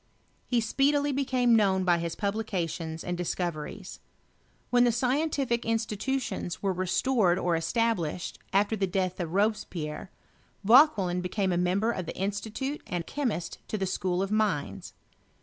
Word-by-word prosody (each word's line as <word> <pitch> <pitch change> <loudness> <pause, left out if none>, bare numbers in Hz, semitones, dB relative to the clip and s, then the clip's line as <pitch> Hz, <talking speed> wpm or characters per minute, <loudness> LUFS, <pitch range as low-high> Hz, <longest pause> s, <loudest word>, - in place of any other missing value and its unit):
He 245 - +2
speedily 285 +5 +2
became 255 -3 +2
known 195 -3 +3
by 175 -2 +3
his 170 -1 -3
publications 180 -6 -3
and 175 - -2
discoveries. 175 +1 -4 0.7
When 245 0 +5
the 240 - +4
scientific 255 0 0
institutions 225 -2 -2
were 195 -1 +1
restored 185 +1 +2
or 175 -2 +1
established, 180 -2 -1
after 205 +3 +2
the 195 -2 0
death 185 0 -1
of 170 -3 -3
Robespierre, 185 -5 -1 0.5
Vauquelin 205 - +5
became 185 +1 -1
a. - - +1
member 185 +6 +1
of 185 -7 -4
the - - -6
Institute 220 +9 -3
and 175 -2 -3
chemist 245 -12 -3
to 215 - -2
the 195 - -1
School 185 0 -1
of 195 - -4
Mines. 210 -9 -1
200 Hz, 140 wpm, -28 LUFS, 180-235 Hz, 0.7 s, When